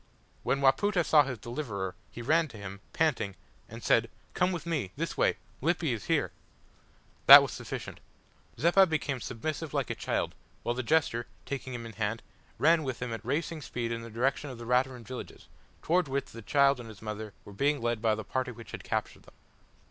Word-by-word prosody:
When 140 - 0
Wapoota 175 +7 +3
saw 150 - +6
his 130 -3 -2
deliverer, 110 -5 -4 0.2
he 120 - -8
ran 160 +5 +3
to 115 -6 -12
him, 100 -1 -8
panting, 115 -12 0 0.3
and 115 +1 -9
said 115 0 +3 0.2
"Come 180 +1 +2
with 175 -1 -4
me 150 - -2
this - - -3
way - - +2 0.2
Lippy 165 -2 +1
is 110 - -5
here!" - - +1 1.0
That - - +13
was - - -3
sufficient. - - -6 0.6
Zeppa 180 +4 +5
became 145 -5 -1
submissive 150 +7 -4
like - - 0
a - - 0
child, - - -2 0.3
while 120 - 0
the 125 - -2
jester, 130 -4 +1 0.2
taking 130 -2 -4
him 120 - -5
by 115 - -7
the - - -19
hand, 110 +1 -1 0.3
ran 165 +2 +5
with 130 -5 -4
him 125 -2 -3
at 115 - -6
racing 160 +1 -2
speed 120 -3 -3
in 115 0 -3
the 115 - -8
direction 130 +5 0
of 130 - -7
the 120 - -8
Raturan 125 0 +1
villages, 125 +3 -8 0.4
towards 175 -2 +2
which 135 0 -2
the 115 - -9
child 140 +4 +3
and 115 -2 -8
her 110 0 -12
mother 105 -1 -5
were 100 - -11
being 140 +7 +1
led 120 -1 -1
by 110 -2 +3
the 110 - -5
party 130 +4 -2
which 115 -1 -11
had - - -7
captured - - -3
them. - - -19
125 Hz, 200 wpm, -30 LUFS, 115-150 Hz, 1.0 s, That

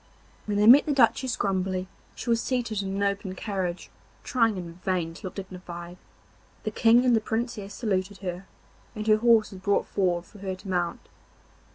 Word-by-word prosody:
When 205 -1 0
they 210 - +4
met 260 +7 +8
the 295 - +2
Duchess 260 -1 +3
Grumbly 185 -1 -1 0.3
she 240 - -3
was 230 0 +2
seated 235 -5 -1
in 195 0 -4
an 200 - 0
open 200 -1 -1
carriage 185 -3 -4 0.3
trying 230 -5 +2
in 170 -2 -6
vain 175 -3 -1
to 185 +3 -8
look - - -9
dignified. 180 -2 -8 0.7
The - - -2
King 235 +2 +4
and 245 -2 +5
the 220 - +2
Princess 220 -3 -3
saluted 195 -3 -1
her, 185 0 -6 0.5
and 215 -1 -4
her 215 -1 +5
horse 230 -1 +4
was 190 - -9
brought 200 +1 +1
forward 180 -3 0
for 210 - -16
her 190 -1 -4
to 185 - -13
mount. 175 -2 -2
200 Hz, 185 wpm, -26 LUFS, 185-225 Hz, 0.7 s, met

